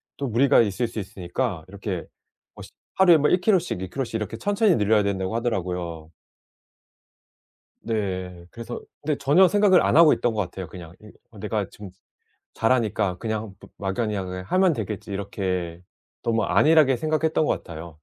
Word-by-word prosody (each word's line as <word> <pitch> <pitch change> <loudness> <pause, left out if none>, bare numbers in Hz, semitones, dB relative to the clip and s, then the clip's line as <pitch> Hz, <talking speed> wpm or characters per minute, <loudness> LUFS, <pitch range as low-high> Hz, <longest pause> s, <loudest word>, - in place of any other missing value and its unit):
또 140 - -3
무리가 125 +3 +4
있을 115 +3 0
수 115 -1 -6
있으니까 95 -1 -4
이렇게 95 -2 -5 0.5
뭐 - - -11
시 - - -13 0.2
하루에 180 -3 +6
뭐 150 0 +2
1 180 - +2
킬로씩 180 - +1
2 95 - -5
킬로씩 135 0 -4
이렇게 110 +1 -3
천천히 205 - +2
늘려야 105 0 +3
된다고 95 +1 -2
하더라고요. 90 -8 -2 1.8
네. 95 -5 -4
그래서 115 +1 -7 0.2
근데 150 0 -1
전혀 170 +7 +5
생각을 205 -2 +4
안 - - +2
하고 165 -2 +8
있던 120 -2 0
것 105 - -1
같아요, 90 +1 -7
그냥. 85 -1 -11
이 105 0 -14 0.3
내가 - - -2
지금 100 -3 -11 0.6
잘하니까 110 -5 +1
그냥 110 -2 -4 0.2
마 95 -1 -3
막연히 110 -2 -1
'그냥 90 -1 -5
하면 185 - +3
되겠지.' 105 -3 -5
이렇게 90 -3 -3 0.4
너무 115 -2 +1
안일하게 155 -4 +4
생각했던 155 +1 0
것 - - -1
같아요. 85 0 -8
110 Hz, 345 characters per minute, -24 LUFS, 95-140 Hz, 1.8 s, 하고